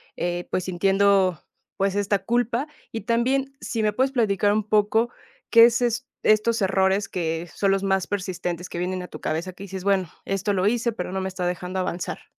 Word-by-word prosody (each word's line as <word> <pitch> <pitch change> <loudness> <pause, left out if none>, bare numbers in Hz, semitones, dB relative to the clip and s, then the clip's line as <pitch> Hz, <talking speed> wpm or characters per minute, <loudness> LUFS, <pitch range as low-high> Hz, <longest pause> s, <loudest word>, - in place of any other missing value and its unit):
eh, 175 0 -3
pues, 185 0 -2
entiendo, 195 -1 +3 0.4
pues 195 0 +1
esta 200 0 +1
culpa, 240 +5 0 0.3
y 225 - -4
también 260 +5 0
si 225 -2 -2
me 210 -1 +2
puedes 260 +5 +1
platicar 205 -5 +2
un 215 0 +1
poco 215 +3 +2 0.4
qué 230 0 +9
eses 240 +2 +1 0.2
estos 215 +1 +3
errores 190 +1 +2
que 165 -1 -2
son 200 - +1
los 195 0 +1
más 190 -1 +1
persistentes 180 -3 -3
que 170 - -5
vienen 180 0 -2
a - - -8
tu - - -10
cabeza, 170 +4 -2
que 190 - -11
dices, 190 -1 -7
bueno, 195 -3 +1 0.2
esto 195 +1 -1
lo 185 0 +1
hice, 235 +2 +1
pero 180 -3 -5
no 190 0 -2
me 190 - -2
está 185 -1 -4
dejando 180 +1 -3
avanzar. 180 -1 -3
195 Hz, 195 wpm, -24 LUFS, 185-225 Hz, 0.4 s, qué